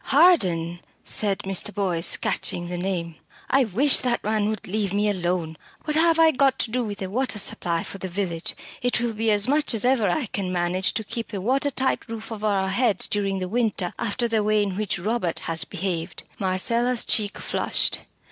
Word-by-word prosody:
"Harden!" 185 Hz, -, +3 dB, 0.3 s
said 200 Hz, -2 st, +2 dB
Mr. 195 Hz, +1 st, 0 dB
Boyce, 185 Hz, -5 st, +2 dB
catching 175 Hz, 0 st, -1 dB
the 175 Hz, -, -4 dB
name. 175 Hz, -3 st, -3 dB, 0.3 s
"I 270 Hz, -1 st, +4 dB
wish 250 Hz, +8 st, +5 dB
that 245 Hz, -2 st, -1 dB
man 215 Hz, 0 st, 0 dB
would 215 Hz, -2 st, -4 dB
leave 200 Hz, 0 st, -2 dB
me 205 Hz, +1 st, +1 dB
alone. 175 Hz, -4 st, -2 dB, 0.3 s
What 300 Hz, -1 st, -1 dB
have 330 Hz, +1 st, +4 dB
I 325 Hz, -1 st, +6 dB
got 270 Hz, -1 st, +2 dB
to 225 Hz, -, -1 dB
do 250 Hz, +1 st, 0 dB
with 205 Hz, -3 st, -5 dB
a -, -, -3 dB
water 250 Hz, 0 st, -1 dB
supply 170 Hz, -4 st, 0 dB
for 195 Hz, -, -8 dB
the 190 Hz, -, -4 dB
village? 175 Hz, -2 st, -2 dB, 0.3 s
It 245 Hz, -1 st, 0 dB
will 240 Hz, -1 st, -1 dB
be 225 Hz, +1 st, 0 dB
as 205 Hz, 0 st, +3 dB
much 290 Hz, -2 st, +2 dB
as 220 Hz, -, 0 dB
ever 250 Hz, -6 st, +3 dB
I 265 Hz, -, 0 dB
can 195 Hz, -3 st, -4 dB
manage 180 Hz, +1 st, 0 dB
to 220 Hz, -, -1 dB
keep 230 Hz, +1 st, -5 dB
a 200 Hz, -, -2 dB
water 265 Hz, +8 st, +1 dB
tight 260 Hz, -1 st, -1 dB
roof 225 Hz, 0 st, -7 dB
over 215 Hz, -1 st, -3 dB
our 195 Hz, -2 st, +1 dB
heads 220 Hz, +1 st, +2 dB
during 200 Hz, -2 st, -1 dB
the 185 Hz, -1 st, -3 dB
winter 210 Hz, -4 st, -1 dB
after 235 Hz, +2 st, 0 dB
the 225 Hz, -2 st, +1 dB
way 210 Hz, 0 st, +2 dB
in 195 Hz, -2 st, -3 dB
which 210 Hz, 0 st, -2 dB
Robert 185 Hz, -2 st, -2 dB
has 165 Hz, 0 st, -1 dB
behaved." 175 Hz, -2 st, -4 dB, 0.2 s
Marcella's 230 Hz, +6 st, +2 dB
cheek 205 Hz, -2 st, +1 dB
flushed. -, -, 0 dB
205 Hz, 200 wpm, -24 LUFS, 185-240 Hz, 0.3 s, I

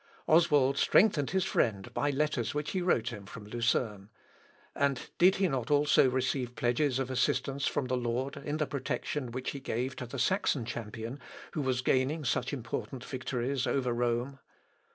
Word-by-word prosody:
Oswald 150 Hz, -5 st, +4 dB
strengthened 165 Hz, -8 st, +4 dB
his 190 Hz, -1 st, +1 dB
friend 100 Hz, -, 0 dB
by 145 Hz, -, 0 dB
letters 145 Hz, -4 st, 0 dB
which 150 Hz, 0 st, -2 dB
he 185 Hz, -, -1 dB
wrote 125 Hz, -10 st, +2 dB
him 105 Hz, -5 st, -8 dB
from 105 Hz, 0 st, -9 dB
Lucerne. 105 Hz, -2 st, -1 dB, 0.6 s
And 140 Hz, -2 st, +1 dB, 0.2 s
did 185 Hz, +2 st, +6 dB
he 190 Hz, -1 st, +2 dB
not 130 Hz, -4 st, -2 dB
also 145 Hz, -2 st, +5 dB
receive 125 Hz, -1 st, -1 dB
pledges 125 Hz, +2 st, +1 dB
of 130 Hz, -1 st, -2 dB
assistance 135 Hz, +2 st, 0 dB
from 140 Hz, -, 0 dB
the 130 Hz, 0 st, -1 dB
Lord 125 Hz, +4 st, -2 dB
in 145 Hz, +1 st, -4 dB
the 155 Hz, -, +1 dB
protection 140 Hz, -1 st, -3 dB
which 130 Hz, +2 st, -3 dB
He 140 Hz, -, -6 dB
gave 130 Hz, 0 st, -2 dB
to 125 Hz, -, -5 dB
the -, -, -7 dB
Saxon 185 Hz, -, +1 dB
champion 115 Hz, +3 st, -6 dB, 0.3 s
who 155 Hz, -, -2 dB
was 130 Hz, -2 st, 0 dB
gaining 135 Hz, +5 st, +1 dB
such 115 Hz, -, 0 dB
important 125 Hz, 0 st, -5 dB
victories 130 Hz, 0 st, -2 dB
over 125 Hz, -1 st, 0 dB
Rome? 120 Hz, +3 st, -1 dB
130 Hz, 170 wpm, -31 LUFS, 120-145 Hz, 0.6 s, did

